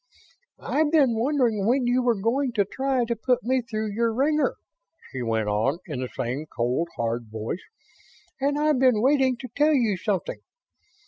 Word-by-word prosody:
"I've 300 0 0
been 285 -7 +4
wondering 230 -4 +1
when 250 +2 +2
you 245 +1 +2
were 240 -4 +1
going 245 +5 0
to 205 -3 +2
try 265 +3 -1
to 235 0 -2
put 250 +2 0
me 255 +2 +1
through 220 -2 -4
your 230 +2 0
wringer," 295 +6 +1 0.6
she 130 - -5
went 110 -2 -1
on, 110 +9 +1
in 150 -7 -5
the 130 - -3
same 130 +6 -4
cold, 125 +7 -1
hard 115 0 -2
voice, 110 +11 -5 0.8
"and 285 +2 0
I've 300 -2 +2
been 250 -4 +3
waiting 265 -2 +3
to 255 - -8
tell 300 +1 +4
you 225 -7 +1
something. 190 0 -2
235 Hz, 175 wpm, -25 LUFS, 170-265 Hz, 0.8 s, been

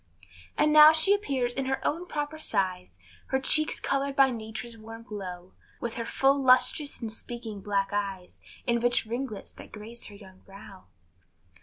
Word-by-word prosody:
And 300 - +3
now 305 0 +10
she 320 +5 +5
appears 270 -12 -1
in 270 - -3
her 265 0 -1
own 340 +4 -2
proper 295 0 -4
size, 185 - -2 0.3
Her 265 - 0
cheeks 310 +3 +4
colored 275 0 -1
by 270 -1 +5
nature's 225 +1 -6
warm 225 +1 -11
glow; 185 -5 -8 0.3
With 235 -1 -4
her 230 - -4
full 275 +3 +2
lustrous 260 +3 +3
and 225 -2 -4
speaking 225 -2 -8
black 200 -1 -1
eyes, 195 -3 -4 0.3
And 235 -1 +1
rich 245 -1 +1
ringlets 235 -2 -6
that - - -13
grace 220 +3 -9
her 205 - -12
young 190 -2 -15
brow. 195 -1 -14
235 Hz, 165 wpm, -27 LUFS, 205-275 Hz, 0.3 s, now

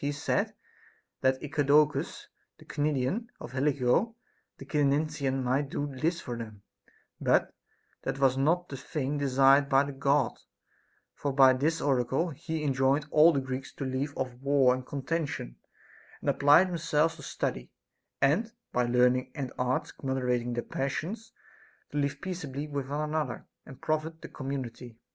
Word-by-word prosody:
He 145 - 0
said 145 - -1 0.7
that 130 0 +1
Eudoxus 150 0 +2 0.3
the - - -17
Cnidian 150 - -1
or - - -8
Helico 140 - +1 0.4
the 135 - -10
Cyzicenian 140 -2 0
might 135 +3 0
do 145 - -2
this 165 +6 0
for 120 - -5
them; 110 -3 -8 0.6
but - - +2 0.5
that - - -3
was 135 -2 +3
not 165 +6 +1
the 135 - -6
thing 145 +1 -3
desired 135 +1 +4
by 135 +1 +5
the 140 - -5
God; 140 0 +1 0.7
for 145 - -3
by 135 -1 +6
this 155 +6 0
oracle 135 +4 +1
he 160 +2 -4
enjoined 135 +1 +2
all 155 +2 +7
the 140 - +1
Greeks 130 0 -5
to 140 - -5
leave 135 +2 -3
off 130 -1 -2
war 135 -2 +4
and 130 0 -5
contention, 145 - -3 0.6
and - - +1
apply 145 +5 +6
themselves 165 -3 0
to - - -11
study, 60 - -3 0.5
and, 175 +12 +2 0.2
by 125 0 +2
learning 125 +1 +3
and 135 -3 -4
arts 125 0 -1
moderating 125 -3 -1
the 120 - -2
passions, 165 - -4 0.6
to 145 - -1
live 140 0 -1
peaceably 150 -6 -4
with 140 -2 -4
one 150 +2 -1
another, 150 -5 -2 0.2
and 130 - -12
profit 155 +1 -2
the - - -7
com 135 -2 -6
munity. 125 -3 -5
140 Hz, 155 wpm, -29 LUFS, 130-150 Hz, 0.7 s, all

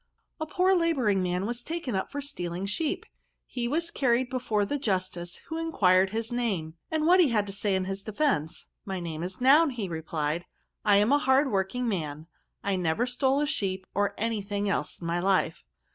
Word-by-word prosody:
A 315 - -3
POOR 370 +4 +3
labouring 275 - +2
man 180 +1 -1
was 240 +2 -3
taken 320 -4 -4
up 190 - -2
for 285 - -3
steaKng 180 -9 -4
sheep. 290 +9 -1 0.4
He 240 -1 -3
was 330 +6 -1
carried 250 -1 +1
before 225 -5 0
the 285 +8 -2
justice^ 185 -6 -2
who 320 0 -4
enquired 190 - +3
his 225 +3 -3
name, 200 -10 -1 0.2
and 315 -1 0
what 360 +3 +6
he 335 -6 +6
had 210 -3 +2
to 200 - -7
say 200 0 0
in 190 0 0
his 195 +1 -3
defence. 205 - -1
* - - -54
My 190 -2 -4
name 165 -2 -5
is 185 +2 -4
Noun/ 290 +6 +6 0.2
replied 160 0 -2
he, 175 - -26 0.2
' - - -50
I 205 -1 +6
am 210 +5 +3
a 290 - +5
hard 265 0 +3
working 200 +6 0
man, 155 -7 -3 0.4
and 195 -2 0
never 170 +8 +1
stole 265 +3 +1
a - - +2
sheep 190 -10 -1
or 205 0 0
any 225 -1 -1
thing 205 0 -2
else 200 - -1
in 170 - -8
my 170 +1 0
life.' 185 -3 +1
205 Hz, 205 wpm, -28 LUFS, 185-265 Hz, 0.4 s, what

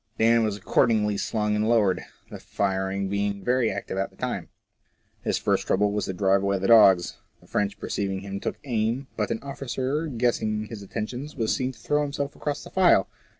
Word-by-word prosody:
Dan 115 +1 +4
was 105 -2 -1
accordingly 105 +1 +2
slung 105 +1 -1
and 105 +1 +1
lowered, 105 -6 +3 0.3
the - - -7
firing 95 0 -1
being 100 0 -2
very 125 -1 +2
active 95 - -4
at 95 - -1
the - - -24
time. - - -4 0.7
His - - 0
first - - 0
trouble 100 +1 +2
was 105 0 -1
to 95 - -3
drive 95 +1 +2
away 100 0 +1
the 95 - -3
dogs. 100 -6 +6 0.2
The - - -21
French 100 0 -1
perceiving 95 -1 -2
him 100 0 -5
took - - -3
aim, 120 0 -1
but 105 - -1
an 115 - -3
officer 140 +2 -3
guessing 115 -4 0
his 110 -1 -8
intentions, 120 +8 -5
was 115 -5 0
seen 130 0 -1
to - - -18
throw 150 0 +1
himself 140 -1 -3
across 145 -1 -3
the - - -11
file. 180 - +4
105 Hz, 195 wpm, -25 LUFS, 100-125 Hz, 0.7 s, dogs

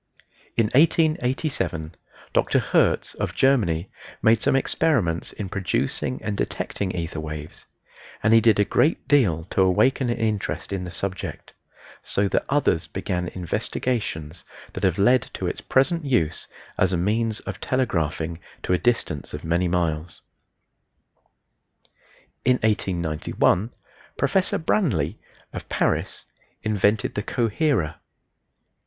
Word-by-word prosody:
In 115 - +4
1887 130 - +1 0.4
Dr. - - +2
Hertz - - +2
of - - -4
Germany 100 -11 +2 0.3
made 110 0 +5
some 140 -1 +2
experiments 120 - +1
in 105 - -5
producing 100 +6 -1
and 105 - -2
detecting 100 0 -3
ether 85 -2 -3
waves, 75 0 -7 0.6
and 110 +1 +4
he 115 - +7
did 110 -2 +4
a 105 - +4
great 140 +10 +1
deal 100 - +3
to - - +2
awaken 125 +8 +3
an 120 - 0
interest 110 -3 -2
in 95 -2 -3
the - - -6
subject, 95 +2 -5 0.5
so 100 0 0
that - - +1
others 135 - +1
began 90 -1 -3
investigations 90 -2 -3 0.3
that - - -6
have 95 -3 +2
led 120 +4 +3
to - - -4
its - - -3
present 165 +5 +2
use 85 - 0 0.3
as 95 - +3
a 90 - +1
means 110 +4 0
of - - -7
telegraphing 85 - -1 0.2
to - - 0
a 90 - +2
distance 115 - -1
of - - -8
many 85 +2 +1
miles. 85 -2 -2 2.2
In 125 +1 +4
1891 90 0 +1 0.5
Professor 190 -1 +1
Branly 115 - 0 0.3
of - - -7
Paris - - -1 0.4
invented 105 0 +1
the 105 - -2
coherer. 115 - 0
100 Hz, 125 wpm, -24 LUFS, 85-125 Hz, 2.2 s, he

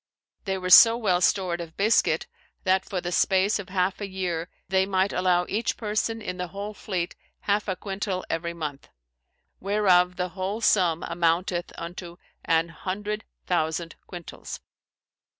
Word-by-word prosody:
They 190 -1 -1
were 185 -1 -3
so 230 +4 +10
well 185 -6 +1
stored 180 -2 +1
of 165 -1 -9
biscuit, 215 +3 +3 0.4
that 190 0 +2
for 185 -2 -3
the 175 - -4
space 195 +3 +3
of 195 - -7
halfe 185 +1 0
a 205 - -2
yeere, 180 -3 -3 0.2
they 190 +1 +2
might 190 0 +1
allow 180 -1 +2
eche 220 +5 -1
person 220 +1 -2
in 180 -2 -4
the 180 0 -3
whole 200 +4 -6
fleete 180 -4 -3 0.3
halfe 205 +1 0
a 190 - 0
quintall 195 -1 -3
every 170 +1 -3
month; 150 -4 -6 0.7
whereof 185 -3 +3
the 180 0 -2
whole 190 +4 -3
summe 180 -7 +3
amounteth 170 +1 0
unto 170 0 -7 0.3
an 165 +1 +2
hundreth 205 +5 -4 0.2
thousand 165 -1 -1
quintals. 175 -3 -8
185 Hz, 150 wpm, -26 LUFS, 175-200 Hz, 0.7 s, so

